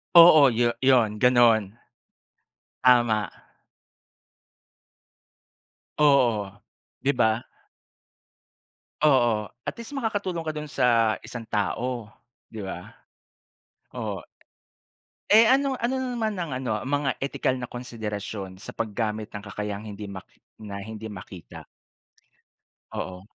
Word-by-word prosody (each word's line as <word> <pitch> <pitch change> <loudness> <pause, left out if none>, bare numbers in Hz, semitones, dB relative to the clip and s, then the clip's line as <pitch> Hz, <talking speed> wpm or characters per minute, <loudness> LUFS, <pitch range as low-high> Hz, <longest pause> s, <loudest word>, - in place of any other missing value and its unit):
Oo, 155 -5 +9
yu 120 +1 +1
yun, 120 -5 +4
ganun. 120 -4 +4 1.0
Tama. 120 -5 +4 2.7
Oo, 120 -9 +3 0.5
'di 140 - +2
ba? 110 -1 +2 1.6
Oo, 120 -8 +3 0.2
at - - -2
least 280 +5 -8
makakatulong 200 -9 -2
ka 155 - -2
dun 150 0 -6
sa 115 -6 +2
isang 120 - -7
tao, 120 +3 -2 0.5
'di 110 - -6
ba? 95 -2 -7 1.0
Oo. - - -4 1.1
Eh, 220 +2 +8
ano 275 +1 +3
ano 250 0 -1
na 260 - -2
naman 220 -3 -1
ang 170 -3 -3
ano, 130 -3 -3
ang 105 - -8
mga 145 0 0
etikal 135 -1 -1
na 125 - -5
konsiderasyon 105 -5 -6
sa - - -7
paggamit 110 -1 -3
ng 105 - -6
kakayahang 105 +1 -5
hindi 105 0 -7
mak 95 -2 -9 0.3
na 100 -2 -7
hindi 110 +2 -7
makita? 90 -7 -10 1.3
Oo. 90 0 -5
120 Hz, 110 wpm, -25 LUFS, 105-140 Hz, 2.7 s, Oo